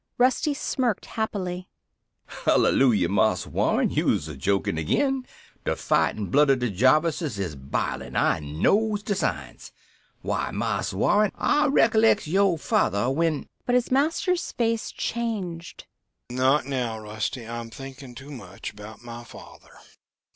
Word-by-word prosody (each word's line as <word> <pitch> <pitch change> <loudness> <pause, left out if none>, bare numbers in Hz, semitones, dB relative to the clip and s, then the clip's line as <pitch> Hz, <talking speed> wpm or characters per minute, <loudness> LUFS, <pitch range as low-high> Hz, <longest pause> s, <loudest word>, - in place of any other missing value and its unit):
Rusty 260 +4 +2
smirked 255 -5 -1
happily. 185 -5 -4 0.6
"Hallelujah, 110 -10 +3
Marse 100 0 +2
Warren, - - +1
you'se 75 -1 0
jokin' 80 +2 0
agin 265 - 0 0.4
de - - 0
fightin' 105 -2 0
blood 145 +1 +5
of 135 - +5
de 125 -3 -1
Jarvises 145 - +2
is 90 -6 -3
bilin' 70 0 -3
I - - +2
knows 205 - +1
de 205 - -1
signs. 195 - -3 0.5
Why, - - -1
Marse - - -2
Warren, 210 0 +3
I 295 0 +2
recollects 225 -5 +4
yoh 190 +2 +2
father 120 -4 +1
when...." 160 +1 0 0.2
But 245 - +2
his 250 0 +1
master's 325 +6 +1
face 230 -1 0
changed. 195 -8 -4 0.5
"Not 130 +4 +2
now, 125 -5 -2
Rusty. 110 +3 -4
I'm 115 0 -6
thinking 135 +1 -10
too 135 +5 -10
much 100 -8 -8
about 105 +2 -12
my 120 0 -8
father. - - -14
140 Hz, 130 wpm, -25 LUFS, -, 0.6 s, blood